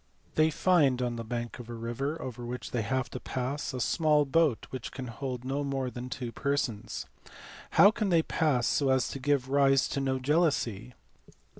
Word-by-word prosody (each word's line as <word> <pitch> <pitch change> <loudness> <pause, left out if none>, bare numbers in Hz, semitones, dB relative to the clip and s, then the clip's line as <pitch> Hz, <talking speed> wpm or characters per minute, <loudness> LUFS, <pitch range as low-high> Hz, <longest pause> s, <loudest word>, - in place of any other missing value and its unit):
They 155 0 +4
find 150 -6 +3
on 120 -1 -1
the 115 - -4
bank 120 +1 -4
of 120 -1 -9
a 120 - -5
river, 120 +7 -3
over 125 -1 -6
which 125 +1 -5
they 120 - 0
have 130 +4 -1
to 125 - -5
pass, 130 +5 -3
a 130 - -5
small 150 +3 +3
boat 145 -3 +2
which 130 -3 -6
can 130 - -6
hold 125 +1 -5
no 140 +2 -1
more 135 -2 -2
than 125 +1 -6
two 125 -2 -5
persons. 120 -6 -2 0.7
How 200 - +9
can 215 -2 -1
they 165 -3 +4
pass 145 -8 +1
so 140 -2 +2
as 130 -2 +3
to 135 - -5
give 140 -1 +1
rise 135 -1 +4
to - - -2
no 135 -1 0
jealousy?" 130 - 0
130 Hz, 190 wpm, -29 LUFS, 120-145 Hz, 0.7 s, How